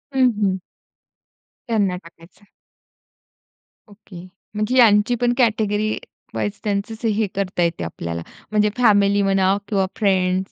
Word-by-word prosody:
हं, 255 -1 +5
हं. 190 -2 +1 1.1
त्यांना 205 -5 +1
टाकायचं. 170 +4 -18 1.5
ओके, 195 -4 -13 0.3
म्हणजे 215 +4 -1
यांची 220 -1 +5
पण 240 0 +2
कॅटेगरी 215 -3 +1 0.4
वाईज 105 -3 -3
त्यांचच 215 +3 -3
हे 215 -1 +1
करता 185 -2 -1
येते 170 - -1
आपल्याला, 85 0 -5 0.3
म्हणजे 210 0 +3
फॅमिली 205 -4 +4
म्हणा 195 0 +2
किंवा 195 -3 +1
फ्रेंड्स 190 -3 +1
205 Hz, 115 wpm, -21 LUFS, 185-215 Hz, 1.5 s, हं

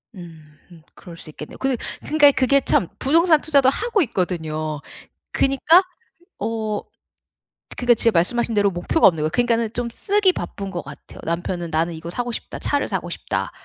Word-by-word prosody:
음음. 160 -1 -14
그럴 170 -3 -12
수 155 - -12
있겠네요. 150 0 -10
그렇고 265 -2 -1 0.2
그러니까 295 -2 +5
그게 275 +1 +3
참 180 - +1
부동산 320 +2 +4
투자도 280 -4 +4
하고 440 - 0
있거든요. 155 - -3 0.5
그니까 295 +7 +4 0.6
어 215 -1 -2 1.0
그러니까 245 -1 +3
제가 230 -3 +1
말씀하신 235 +6 0
대로 205 -1 +3
목표가 175 - +2
없는 165 -5 -2
거예요. 155 - 0
그러니까는 235 -2 +1
좀 240 0 -3
쓰기 400 - +2
바쁜 195 - -6
것 175 -3 -5
같아요. 140 +1 -12
남편은 170 0 -3
"나는 165 +2 0
이거 160 +1 -7
사고 245 +6 -3
싶다. - - -7
차를 285 -1 0
사고 - - -3
싶다." - - -3
215 Hz, 380 characters per minute, -21 LUFS, 170-270 Hz, 1.0 s, 그러니까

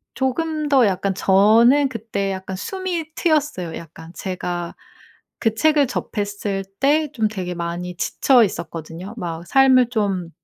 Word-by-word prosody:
조금 305 +3 -1
더 265 -5 +5
약간 195 0 -1
저는 225 +9 +5
그때 215 -4 -3
약간 190 0 -5
숨이 350 - -4
트였어요 295 - 0
약간. 165 0 -11
제가 175 -2 -4 0.6
그 225 -2 +1
책을 300 +3 +3
접했을 205 -4 -3
때 295 +2 +2
좀 220 -5 +1
되게 185 -4 -4
많이 175 +1 -4
지쳐 250 +6 +3
있었거든요. 170 -1 -5
막 170 -4 -5
삶을 260 -1 +5
좀 200 -7 -1
210 Hz, 255 characters per minute, -21 LUFS, 180-270 Hz, 0.6 s, 더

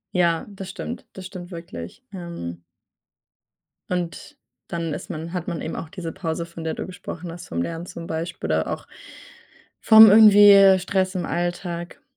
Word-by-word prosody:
Ja, 170 -2 +2
das 195 -2 -9
stimmt, 235 +4 -7
das 190 - -9
stimmt 185 -2 -9
wirklich. 165 - -9
Ähm 170 - -7 1.3
und 175 -2 -4 0.3
dann 165 -2 -3
ist - - -7
man 160 +2 -6
hat 180 -2 -4
man 170 -3 -4
eben 160 - -5
auch 155 - -6
diese 180 -4 -6
Pause, 165 -1 -4
von 170 -1 -10
der 160 - -2
du - - -5
gesprochen 180 -2 -8
hast, 175 - -10
vom 85 - -3
Lernen 165 - -4
zum 170 -1 -9
Beispiel 160 - -4
oder 80 0 0
auch - - -5 0.9
vom 220 0 +9
irgendwie 205 -2 +8
Stress 185 +1 -1
im 180 - -2
Alltag. 175 0 -4
175 Hz, 165 wpm, -23 LUFS, 165-190 Hz, 1.3 s, vom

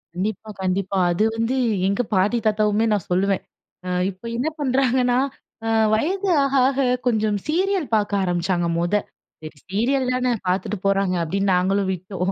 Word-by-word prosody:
கண்டிப்பா, 210 +3 -3
கண்டிப்பா 190 +1 -1
அது 175 +5 +1
வந்து 230 +3 0 0.3
எங்க 200 +4 +1
பாட்டி 195 +6 +2
தாத்தாவுமே 215 0 +2
நான் 200 -5 -2
சொல்லுவேன். 195 +2 +1 0.7
இப்ப 190 +1 -11
என்ன 255 +6 -1
பண்றாங்கன்னா 255 -2 +2 0.8
வயது 375 - 0
ஆக, 275 0 -1
ஆக 270 0 -1 0.3
கொஞ்சம் 215 -3 +1
சீரியல் 365 +1 0
பாக்க 210 -1 0
ஆரம்பிச்சாங்க, 175 -1 0
மொத. 175 +3 -1 0.8
சீரியல் 250 +6 +1
தானே 255 0 +1 0.2
பாத்துட்டு 185 +3 -1
போறாங்க. 195 -2 +2
அப்படின்னு 195 +4 0
நாங்களும் 190 +2 +1
விட்டோம். 185 +1 -3
205 Hz, 130 wpm, -22 LUFS, 190-250 Hz, 0.8 s, பாட்டி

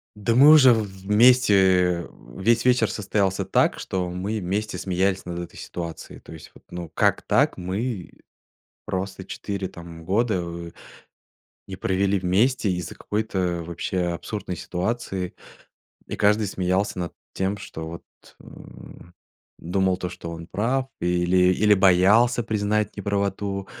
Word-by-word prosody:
Да, 105 +3 0
мы 140 +4 +8
уже 140 -5 +8
в 110 -1 0 0.2
вместе, 120 +1 +5 0.5
э, - - -10 0.3
весь 115 +5 +2
вечер 125 -3 +3
состоялся 100 -2 -1
так, - - +2
что 90 -2 -3
мы 95 +5 -3
вместе 105 +4 -3
смеялись 95 +1 0
над 85 -1 -5
этой 85 - -8
ситуацией 85 -2 -7
то - - -13
есть 80 - -12
вот, - - -19
ну, 90 0 -6
вот 85 - -11
как - - +2
так - - +2
мы 95 +2 -4 0.7
просто 95 0 -4
4, 100 -2 -4
там, 85 -2 -11
года, 105 +4 +1
э, 85 0 -7 1.0
не 95 -1 -7
провели 95 +1 0
вместе 100 +6 +1
из-за 90 -3 -4
какой-то 95 -5 -2
вообще 85 +2 -3
абсурдной 95 +1 -5
ситуации, 95 +1 -3 0.7
и - - -5
каждый 105 +1 +3
смеялся 95 +1 -1
над 85 - -4 0.2
тем 95 +2 -1
что 80 -4 -7
вот, 85 +1 -9 0.4
э, - - -16 1.1
думал 95 +2 0
то, 90 - -4
что 85 - -8
он 85 0 -8
прав 125 +8 -1
или 90 +1 +3
или 105 +1 +4
боялся 100 +6 +4
признать 105 -1 -1
неправоту, 100 -1 -2
95 Hz, 140 wpm, -24 LUFS, 90-105 Hz, 1.1 s, мы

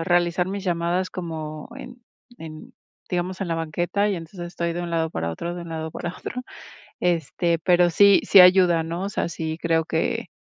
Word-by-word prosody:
a - - -2
realizar 175 0 +2
mis 195 0 -4
llamadas 175 +1 -1
como 155 -3 -6
en 250 -1 -11 0.3
en, 155 -1 -11 0.3
digamos, 180 +1 -3
en 190 - -2
la 165 - 0
banqueta 175 +6 -1
y 195 - -1
entonces 170 +2 -9
estoy 170 -1 -3
de 175 - -3
un 175 - -5
lado 165 -1 0
para 85 - -3
otro, 170 - -5
de 175 - -6
un 170 - -9
lado 160 0 -4
para 175 +2 -5
otro, 250 - -6 0.6
este, 170 -1 0
pero 175 +1 +4
sí 200 +3 +6
sí 195 - +8
ayuda, 180 -2 +6
¿no?, 170 +3 -4
o 200 - -2
sea, 195 - -2
sí 160 -1 -4
creo 165 -1 +2
que, 160 0 -1
170 Hz, 200 wpm, -23 LUFS, 165-180 Hz, 0.6 s, sí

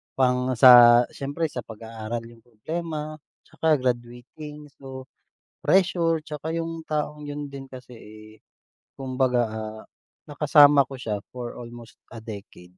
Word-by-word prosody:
pang 125 0 +1
sa 120 -2 +9
siyempre 145 +4 -3
sa 125 - -5
pag-aaral 115 +1 -6
yung 115 -1 -18
problema, 155 +6 -5 0.3
tsaka 155 -3 +1
graduating. 125 +5 -5
So, 130 -1 -9 0.6
pressure, 170 -4 +2
tsaka 155 +1 -6
yung 165 -1 -4
taong 150 -1 -3
'yon 145 0 -6
din 135 -1 -8
kasi, 125 -1 -12
eh, 110 0 -14 0.7
kumbaga, 130 -2 +1
ah, 110 0 -6 0.5
nakasama 145 -1 +6
ko 135 - -8
siya 105 -4 -3
for 125 -1 -7
almost 120 -1 -11
a 115 - -9
decade. 100 -4 -10
130 Hz, 125 wpm, -24 LUFS, 120-150 Hz, 0.7 s, sa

